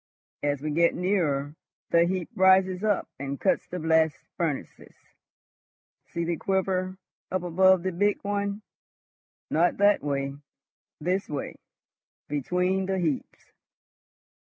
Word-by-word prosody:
As 145 -1 -1
we 155 - -1
get 170 +3 +3
nearer, 155 -7 0 0.4
the 170 0 +5
heap 180 -1 -2
rises 190 0 +4
up 210 -3 +1
and 140 0 -4
cuts 190 - +1
the 180 - -5
blast 160 -2 +2 0.2
furnaces. 160 -5 -4 1.1
See 170 - -3
the 170 0 -1
quiver 190 0 -1 0.3
up 185 -1 -2
above 185 +1 +4
the 185 - -1
big 205 +4 +1
one. 200 +1 -2 0.9
Not 170 +3 +2
that 205 +1 +4
way! 140 -1 -2 0.7
This 180 +5 -1
way, 145 -2 -4 0.7
between 180 +6 0
the 190 0 0
heaps. 160 -6 -3
180 Hz, 120 wpm, -27 LUFS, 155-190 Hz, 1.1 s, the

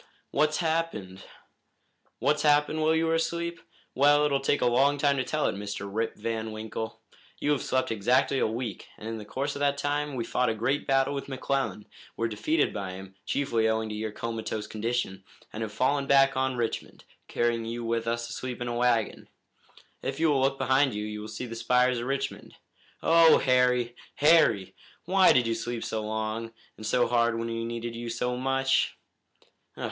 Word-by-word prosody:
"What's 155 0 +2
happened?" 160 - -2 1.0
"What's 145 +4 +1
happened, 150 +1 +3
while 160 +1 +3
you 160 0 +2
were 165 - +1
asleep? 170 +1 -1 0.3
Well, 145 +2 +5
it 150 - +1
will 140 - +2
take 140 0 +1
a - - +3
long 135 +4 +3
time 140 0 +2
to 130 - +1
tell 155 +4 -1
it, - - +1
Mr. 100 0 -5
Rip 110 +3 -2
Van 110 -1 -3
Winkle. 110 +1 -6 0.4
You 145 - 0
have 145 - +1
slept 130 -2 0
exactly 125 +5 +2
a - - +2
week, 115 0 -5
and 110 - -8
in 115 0 -4
the 105 - -9
course 140 +6 -3
of - - -5
that 140 0 +1
time 145 0 -1
we 120 - -2
fought 125 -1 +1
a 110 - -1
great 135 +7 -1
battle 135 0 +2
with 140 - -4
McClellan, 130 -6 -2 0.3
were 115 - 0
defeated 145 +8 0
by 95 -3 -4
him, 95 0 -10
chiefly 115 -5 +1
owing 110 0 0
to 105 - -4
your 110 0 -3
comatose 110 -1 -4
condition, 110 -3 -3 0.3
and 110 - -5
have 110 -1 -3
fallen 135 +5 +1
back 135 -1 +5
on 130 0 0
Richmond, 120 -2 -4 0.2
carrying 120 -1 0
you 115 +1 -4
with 115 0 -1
us 115 0 -1
asleep 125 +1 -5
in 120 - -3
a 120 - -2
wagon. 120 -2 0 0.7
If - - -4
you 160 -1 +3
will 135 -2 +2
look 135 +1 +1
behind 130 -3 +2
you 105 0 -3
you 105 0 -5
will 105 - -7
see 110 +3 -6
the 115 -1 -7
spires 125 +1 +2
of 120 - -4
Richmond. 135 0 -3 0.5
Oh, 165 0 +7
Harry! 125 -2 +2 0.2
Harry! 150 - +4 0.3
Why 185 +2 +5
did 125 -2 +4
you 115 - 0
sleep 115 +1 -4
so 110 - -2
long 110 +1 -3 0.2
and 110 - -7
so 125 +2 +3
hard 120 -1 +2
when 115 0 -3
we 115 0 -3
needed 115 0 -4
you 120 0 -5
so 125 +2 -1
much?" 135 +1 +1
120 Hz, 195 wpm, -28 LUFS, 115-140 Hz, 1.0 s, Oh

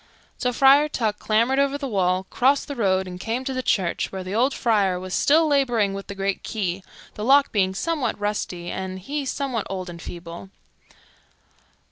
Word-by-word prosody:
So 250 - 0
Friar 275 +4 +5
Tuck 220 -7 -1
clambered 230 +5 +2
over 280 0 +2
the 285 -1 -4
wall, 185 -4 0
crossed 275 +3 +2
the 285 - -5
road, 190 -5 +1
and 180 0 -8
came 230 +6 -2
to 265 - -2
the 255 - -2
church, 190 -8 0
where 190 -1 -5
the 185 +1 -6
old 250 +6 +2
friar 205 -8 +1
was 185 0 -7
still 320 +3 +4
laboring 245 -9 +2
with 195 0 -7
the 200 - -7
great 195 0 -2
key, 195 -4 -3 0.3
the 210 - -6
lock 275 +4 +5
being 190 -3 +1
somewhat 310 +1 -1
rusty 205 -4 -3
and 190 0 -4
he 280 +9 -4
somewhat 260 -6 -2
old 185 -2 -5
and 170 -1 -10
feeble. 170 +2 -9
210 Hz, 185 wpm, -23 LUFS, 190-270 Hz, 0.3 s, Friar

